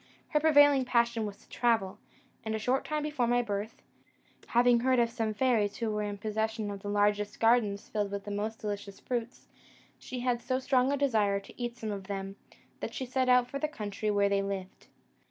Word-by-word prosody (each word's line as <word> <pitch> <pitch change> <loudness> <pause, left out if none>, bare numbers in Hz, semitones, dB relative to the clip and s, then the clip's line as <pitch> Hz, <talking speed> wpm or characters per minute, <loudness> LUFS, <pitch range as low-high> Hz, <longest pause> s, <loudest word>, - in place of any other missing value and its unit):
Her 300 - +2
prevailing 290 -3 +6
passion 235 -3 +1
was 200 -1 -8
to - - -24
travel; 220 -4 0 0.4
and 220 0 -2
a - - 0
short 250 +5 0
time 305 -1 -2
before 295 -5 0
my 245 +1 +2
birth, 205 0 -4 0.6
having 240 0 +4
heard 255 +1 +2
of 235 -1 +2
some 225 -2 -1
fairies 215 -4 +2
who 230 -2 -1
were 210 0 -1
in 205 -1 -3
possession 220 0 -2
of 200 -1 -7
the 205 - -5
largest 205 0 +1
gardens 225 -3 +2
filled 205 -2 -1
with 200 0 -4
the 205 - -6
most 215 +2 -3
delicious 205 -2 -5
fruits, 240 0 -4 0.5
she 250 -1 -6
had 245 -1 0
so 255 +1 -1
strong 260 0 +2
a 285 - +1
desire 215 -8 +2
to 200 - -13
eat 240 0 -3
some 220 -2 -4
of 195 -2 -5
them, 195 -1 -4 0.4
that - - -5
she 265 - -3
set 255 0 0
out 250 -1 +5
for 275 - -5
the 305 - 0
country 210 -7 -4
where 200 -1 +3
they 200 0 +1
lived. 195 -1 -6
225 Hz, 210 wpm, -30 LUFS, 205-250 Hz, 0.6 s, prevailing